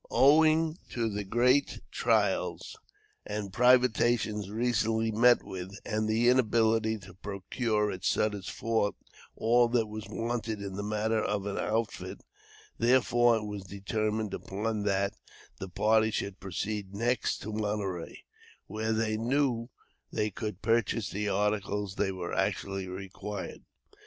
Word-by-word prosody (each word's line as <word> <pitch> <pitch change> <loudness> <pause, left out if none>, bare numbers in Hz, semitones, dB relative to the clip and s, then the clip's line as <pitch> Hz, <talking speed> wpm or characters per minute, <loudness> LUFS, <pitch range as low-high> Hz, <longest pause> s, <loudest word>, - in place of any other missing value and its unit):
Owing 155 +3 +4
to 115 -2 -1
the 105 0 -3
great 125 +7 +2
trials 100 -6 0 0.5
and 105 -2 -5
privations 120 -4 +3
recently 115 0 +1
met 120 +3 +5
with, 95 +1 -7
and 110 0 -1
the 115 +2 +2
inability 115 -2 +3
to 95 -3 -13
procure 105 +3 -1
at 95 - -7
Sutter's 105 -3 0
Fort 115 -3 0 0.4
all 120 +2 +4
that 115 -1 +2
was 110 0 -7
wanted 115 -2 -3
in 100 -1 -5
the 100 - -4
matter 110 +1 0
of 100 -1 -1
an 100 - -3
outfit, 110 -1 -2 0.6
therefore 120 -1 +4
it 110 -1 -2
was 105 -1 -5
determined 105 +2 -2
upon 105 +2 -3
that 100 0 +1 0.5
the 95 - -6
party 110 +4 +3
should 100 -3 -3
proceed 100 +1 -4
next 120 +2 0
to 110 +2 -5
Monterey, 105 -5 -3 0.4
where 110 +2 -2
they 110 -1 0
knew 120 0 0 0.4
they 105 0 -1
could 105 -1 -5
purchase 115 -2 +1
the 105 +1 -2
articles 105 0 0
that 95 -1 -1
were 90 -2 -5
actually 95 -1 -1
required. 95 +2 -6
110 Hz, 130 wpm, -30 LUFS, 100-115 Hz, 0.6 s, met